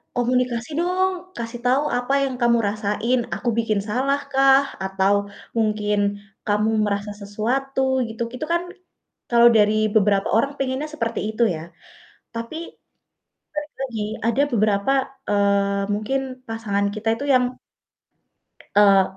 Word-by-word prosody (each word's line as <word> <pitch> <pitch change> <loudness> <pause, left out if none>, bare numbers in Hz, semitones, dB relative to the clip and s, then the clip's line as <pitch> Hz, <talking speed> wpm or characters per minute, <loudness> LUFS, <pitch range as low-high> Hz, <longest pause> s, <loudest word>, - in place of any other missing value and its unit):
"Komunikasi 245 0 0
dong, 370 +2 +1 0.2
kasih 235 +1 -5
tahu 260 +3 +3 0.2
apa 245 +2 -2
yang 265 -2 -2
kamu 235 0 +4
rasain, 210 +4 0 0.2
aku 240 - -2
bikin 220 -3 +1
salah 260 +7 0
kah 270 0 +5 0.2
atau 195 +1 +2 0.4
mungkin 210 -2 +1 0.5
kamu 210 +1 +2 0.2
merasa 205 0 -2
sesuatu 250 +7 -1 0.3
gitu." 225 +1 -4
Itu 285 - -4
kan 345 - +1 0.7
kalau 235 0 +7
dari 210 0 +4 0.2
beberapa 200 -2 +3
orang 275 +5 +1
pengennya 270 +2 -1
seperti 230 -6 -2
itu 235 - +2
ya, 155 - -6 0.8
tapi 230 +6 -5 1.0
balik 300 0 -5
lagi 245 -5 -3 0.3
ada 235 +4 +2
beberapa, 210 +1 +2 0.4
eee, 200 -1 +2
mungkin 215 +6 -1 0.3
pasangan 210 -3 -1
kita 215 +1 -5
itu 280 - -4
yang 250 -1 +4 1.3
eee, 200 -1 +6
230 Hz, 125 wpm, -22 LUFS, 205-260 Hz, 1.3 s, kalau